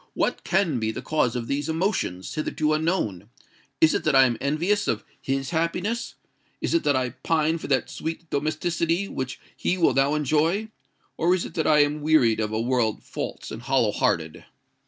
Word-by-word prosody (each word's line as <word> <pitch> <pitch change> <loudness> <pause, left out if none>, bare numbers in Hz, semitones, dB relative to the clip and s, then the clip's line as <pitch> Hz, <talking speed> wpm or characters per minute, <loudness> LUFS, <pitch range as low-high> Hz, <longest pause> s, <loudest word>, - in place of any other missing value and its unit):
What - - 0
can 175 -10 +1
be 110 -1 -1
the 110 - -5
cause 150 -7 +1
of 120 -2 -2
these 145 +4 -2
emotions—hitherto 155 - -1
unknown? 155 - -1 0.5
Is 160 - +5
it - - 0
that 155 -2 +3
I 135 0 +8
am 120 -2 +1
envious 175 +9 +1
of 110 - -1 0.2
his 135 +1 -2
happiness? 180 +8 -1 0.4
Is - - -2
it 335 - +2
that 145 - +3
I 130 -1 0
pine 160 +4 0
for - - -6
that 135 -2 +1
sweet 165 +1 -5
domesticity 165 +5 0
which 130 -7 -5 0.2
he 185 - 0
will 170 - +3
now 135 +2 +2
enjoy? 155 - +1 0.5
Or 175 +3 +3
is 185 - -2
it - - -9
that 160 - 0
I 150 -1 +6
am 150 +1 -2
wearied 145 -8 +3
of 110 -1 -1
a 110 - -1
world 120 -2 0
false - - -6
and 110 - -6
hollow 125 -4 +2
hearted?" 80 -8 -1
150 Hz, 185 wpm, -25 LUFS, 125-165 Hz, 0.5 s, I